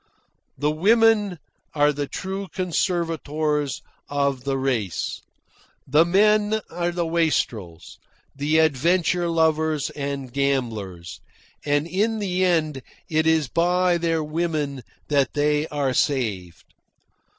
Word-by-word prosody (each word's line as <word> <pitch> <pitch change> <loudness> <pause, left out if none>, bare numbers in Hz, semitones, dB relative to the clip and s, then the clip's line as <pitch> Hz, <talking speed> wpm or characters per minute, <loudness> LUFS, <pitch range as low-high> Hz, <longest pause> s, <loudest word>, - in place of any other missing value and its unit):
The 150 +1 +1
women 210 +2 +3 0.4
are 145 0 +3
the 145 0 -3
true 190 +4 -5
conservators 160 - -1 0.3
of 140 -2 -1
the 135 -1 0
race. 125 -9 -2 0.7
The 150 +5 +4
men 210 +4 +3
are 175 +1 -1
the 175 -1 -2
wastrels, 125 - -2 0.4
the 145 +3 +1
adventure 170 +3 +2
lovers 160 -2 +1
and 140 -3 -5
gamblers, 115 -11 -2 0.4
and 145 +1 +1
in 205 +6 0
the 185 -3 -1
end 155 -6 +1 0.3
it 155 0 +2
is 160 -3 +3
by 175 +4 +2
their 165 -1 0
women 150 -3 -2 0.3
that 140 -3 +2
they 150 +1 +1
are 140 -3 -1
saved. 100 - -1
155 Hz, 110 wpm, -23 LUFS, 140-175 Hz, 0.7 s, The